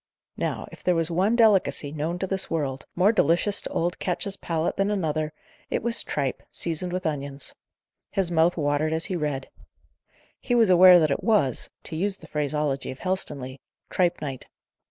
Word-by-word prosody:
Now, - - -3
if - - -12
there 180 - +2
was 165 0 0
one 190 +7 +2
delicacy, 205 -10 +3
known 155 +3 -2
to 190 - -2
this 190 0 -2
world, 140 -5 -2
more 185 +4 +4
delicious 195 +1 +2
to - - -5
old 175 +1 -1
Ketch's 195 +2 -2
palate 165 -3 -2
than 195 +1 +1
another, 155 -6 -1 0.4
it - - -1
was 235 0 -2
tripe, 140 -3 -2
seasoned 170 +2 -1
with 185 0 -3
onions. 140 -3 -3 0.6
His 190 -3 0
mouth 170 +1 +3
watered 150 +1 +1
as 160 0 +1
he 190 - -3
read. 150 -5 -2 0.9
He 245 - -1
was 225 -5 +5
aware 180 0 +9
that 155 -4 +3
it - - -1
was 205 - +2
to - - -7
use 195 +4 -1
the - - -14
phraseology 150 -2 -2
of 130 - -6
Helstonleigh 140 -8 -4 0.3
"tripe 175 -1 +1
night." 135 -3 -6
165 Hz, 175 wpm, -25 LUFS, 150-190 Hz, 0.9 s, aware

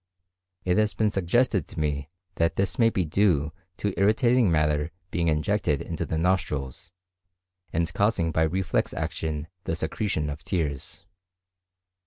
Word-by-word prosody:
It 90 +2 +3
has 105 -1 +1
been 110 -1 +2
suggested 95 - +1
to - - -7
me 75 -2 -1 0.3
that 85 0 +2
this 95 +4 -1
may 115 -1 +6
be 95 -5 0
due 80 -4 +2 0.3
to 100 -2 -1
irritating 115 +1 +4
matter 75 -1 +2 0.2
being 85 -1 0
injected 80 -1 +1
into - - -4
the 80 - -1
nostrils, 80 -5 -1 0.8
and 85 +1 -1
causing 100 -6 +2
by 80 - +1
reflex 90 +4 0
action 75 -1 -3 0.2
the 80 - -1
secretion 80 -2 -1
of 75 - -8
tears. 75 -4 -3
85 Hz, 140 wpm, -26 LUFS, 75-100 Hz, 0.8 s, may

